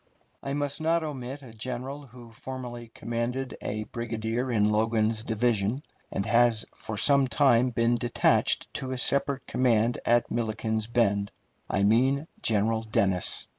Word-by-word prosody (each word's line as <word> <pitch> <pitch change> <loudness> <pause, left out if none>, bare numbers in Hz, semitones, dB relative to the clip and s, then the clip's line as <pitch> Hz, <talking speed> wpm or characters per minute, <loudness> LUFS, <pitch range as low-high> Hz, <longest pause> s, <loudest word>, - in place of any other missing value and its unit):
I 140 - -4
must 145 +1 -2
not 165 +1 +2
omit 140 -2 -6
a 120 -4 -12
general 130 +5 -6
who 120 -1 -14
formerly 120 -1 -7
commanded 120 +3 -3
a 110 +1 -3
brigade 115 0 -5
in 115 -2 +1
Logan's 110 0 +1
division, 115 +2 0 0.3
and 100 - -2
has 115 -1 +3
for 110 - -7
some 140 +3 +4
time 130 -2 +3
been 115 0 +1
detached 120 0 +1
to 130 - -4
a 130 - -3
separate 140 +1 +1
command 120 -2 +1
at 120 0 +2
Milliken's 110 -1 -1
Bend. 100 -4 +1 0.4
I 100 - +1
mean 130 +8 +3 0.2
General 110 +1 +2
Dennis. 100 -5 0
120 Hz, 140 wpm, -27 LUFS, 110-130 Hz, 0.4 s, some